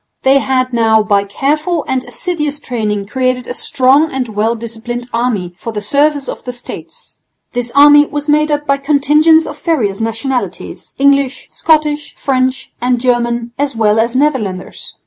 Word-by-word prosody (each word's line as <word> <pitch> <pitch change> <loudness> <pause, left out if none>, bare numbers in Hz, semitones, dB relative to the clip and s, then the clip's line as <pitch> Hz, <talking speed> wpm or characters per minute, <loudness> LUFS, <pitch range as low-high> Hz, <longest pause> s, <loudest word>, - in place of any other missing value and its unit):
They 270 +1 +4
had 255 -1 -1
now 220 -2 +3
by 200 -1 +1
careful 300 - -1
and 260 -1 -1
assiduous 300 -5 -3
training 215 -7 -3
created 255 +2 -1
a - - -4
strong 270 +5 +2
and 260 -3 -3
well 220 +2 0
disciplined 235 +1 -6
army 225 -7 -1
for 230 - -5
the 215 - -4
service 285 +6 +1
of - - -6
the 250 - -5
States. 245 0 -10 0.3
This 245 -1 -2
army 290 +1 +7
was 290 0 -5
made 300 +1 +2
up 295 0 -1
by 275 -1 +1
contingents 300 +3 +3
of - - -9
various 225 - 0
nationalities, 225 +3 -4
English, 280 -1 +1
Scottish, 300 -2 0
French 260 -1 -1
and 245 0 +1
German 240 -1 0
as 285 -3 -1
well 220 -1 +2
as 235 +2 0
Netherlanders. 245 -10 -2
255 Hz, 160 wpm, -14 LUFS, 230-290 Hz, 0.3 s, army